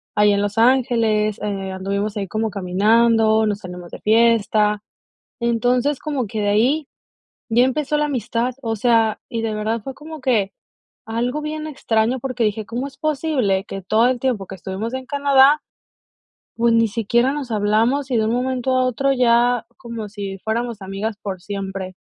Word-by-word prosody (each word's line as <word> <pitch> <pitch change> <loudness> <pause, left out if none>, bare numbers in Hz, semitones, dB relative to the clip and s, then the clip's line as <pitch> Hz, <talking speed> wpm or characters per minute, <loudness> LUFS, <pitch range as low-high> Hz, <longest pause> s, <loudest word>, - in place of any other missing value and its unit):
ahí 210 0 +5
en 200 - +1
Los 205 +1 -2
Ángeles, 225 -4 +2
eh, 195 -2 -3
anduvimos, 200 +2 -3
ahí 195 -2 -3
como 220 +4 -1
caminando, 220 +3 +3
nos 205 -1 -1
salimos 180 -2 -9
de - - -8
fiesta. 215 -2 +3 0.6
Entonces, 245 +4 +1
como 275 -7 -2
que 215 +2 -3
de 205 - +1
ahí 265 +8 +2 0.6
ya 235 +2 +4
empezó 280 +3 0
la 300 - +1
amistad. 245 -2 -2
O 225 -2 -2
sea, 225 -1 +2
y 230 - -3
de 220 -1 -1
verdad 215 +1 -2
fue 270 - -6
como 315 +2 -10
que 220 -7 +1 0.6
algo 240 +6 -2
bien 305 0 -4
extraño, 240 -4 0
porque 255 -2 -2
dije: 210 0 -1
"Cómo 245 +5 -3
es 280 0 -11
posible 275 -11 0
que 195 - -7
todo 220 +6 +3
el 255 -1 -1
tiempo 235 -8 -1
que - - -8
estuvimos 195 +7 -5
en 260 0 -5
Canadá, 280 +1 +4 1.0
pues, 235 0 +2
ni 230 0 +4
siquiera 235 +5 +1
nos 280 -5 -5
hablamos, 225 +6 +1
y 245 - +1
de 220 - +2
un 220 - 0
momento 255 +1 0
a 255 - +3
otro 275 +2 +1
ya 245 -1 +3
como 230 -2 -6
si 200 -1 -6
fuéramos 230 -1 -2
amigas 195 +3 -4
por 190 -3 -5
siempre". 195 -1 -5
230 Hz, 175 wpm, -21 LUFS, 210-255 Hz, 1.0 s, ahí